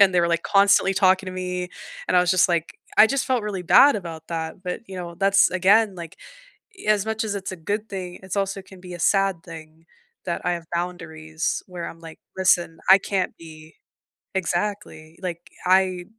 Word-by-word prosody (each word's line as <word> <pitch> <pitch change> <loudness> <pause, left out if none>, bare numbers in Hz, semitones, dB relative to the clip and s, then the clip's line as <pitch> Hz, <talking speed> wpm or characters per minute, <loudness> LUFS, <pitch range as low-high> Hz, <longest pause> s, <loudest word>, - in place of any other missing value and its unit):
and 190 -2 +6
they 175 - +4
were, 170 - +1
like, 170 0 0
constantly 200 -1 +4
talking 190 0 +3
to 185 - -5
me, 180 -1 -4 0.4
and - - +1
I - - +7
was 180 0 +1
just 185 0 +4
like 170 -2 -2 0.2
I 215 - +9
just 275 +3 -1
felt 255 -3 0
really 200 -3 -4
bad 275 - +6
about 165 -4 -8
that, 165 +2 -5
but, 180 +3 -5
you 190 - -8
know, 170 -1 -7
that's 195 +2 +4
again, 195 +3 +3
like, 170 -2 -9 0.7
as 210 -1 +2
much 220 0 -2
as 205 - -3
it's 195 -1 -5
a - - -5
good 205 +6 -4
thing, 180 -2 -6
it's 190 +1 -5
also 195 0 -2
can 190 -1 -15
be 180 -1 -9
a 175 - -8
sad 195 -1 +1
thing 160 -1 -12 0.4
that 170 - -3
I 180 - +1
have 170 -1 -5
boundaries 165 -2 -3
where 180 -2 -6
I'm 165 - -13
like, 165 -1 -12 0.2
listen, 175 -3 +1
I 190 - +10
can't 195 -1 -2
be 155 -1 -14 0.6
Exactly, 175 -3 -3
like, 175 -1 -6 0.2
I 185 -1 +2
180 Hz, 200 wpm, -23 LUFS, 170-195 Hz, 0.7 s, I